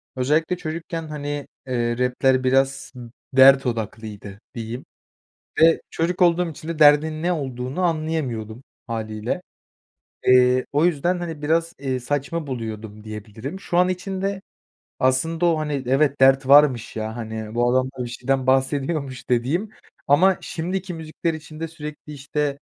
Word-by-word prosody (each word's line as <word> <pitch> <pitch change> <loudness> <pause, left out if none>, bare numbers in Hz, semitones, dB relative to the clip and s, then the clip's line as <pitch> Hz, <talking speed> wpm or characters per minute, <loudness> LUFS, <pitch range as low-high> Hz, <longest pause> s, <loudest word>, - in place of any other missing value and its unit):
özellikle 155 +7 +1
çocukken, 165 0 -5
hani, 145 -1 -5 0.2
eee, 120 -2 -1
rap'ler 130 +1 +2
biraz 135 +1 +1 0.4
dert 135 0 +7
odaklıydı 110 -3 -5 0.2
diyeyim 115 +2 -6 0.8
ve 165 0 +6
çocuk 175 +3 -1
olduğum 175 0 +3
için 155 +1 -10
de 165 -2 -4
derdin 155 +1 +5
ne 180 +1 +1
olduğunu 130 +1 -3
anlayamıyordum 145 -9 -2 0.2
hâliyle. 110 +7 -3 0.8
Eee, 125 0 +5
o 150 +3 +3
yüzden, 175 +2 +1
hani, 165 -4 -6
biraz, 165 +2 +1
eee, 130 -2 -2
saçma 145 +5 -2
buluyordum 110 -4 -6
diyebilirim. 110 - -7
Şu 175 - -3
an 180 0 +4
için 185 +1 -3
de 195 0 -1 0.6
aslında 160 +7 +1
o, 165 -2 +3
hani, 150 -3 -2
evet, 140 +1 +2
dert 135 0 +5
varmış, 140 -6 +5
ya, 110 +1 -4
hani, 110 -1 -6
bu 120 +1 +2
adam 130 0 +2
da 125 - -2
bir - - -5
şeyden 130 +2 -1
bahsediyormuş 135 0 0
dediğim 145 - 0 0.4
ama 180 +7 +4
şimdiki 180 +2 -4
müzikler 160 +1 -3
için 155 0 -10
de 165 - -3
sürekli, 150 -1 -9
işte, 145 0 -2
140 Hz, 145 wpm, -23 LUFS, 125-165 Hz, 0.8 s, dert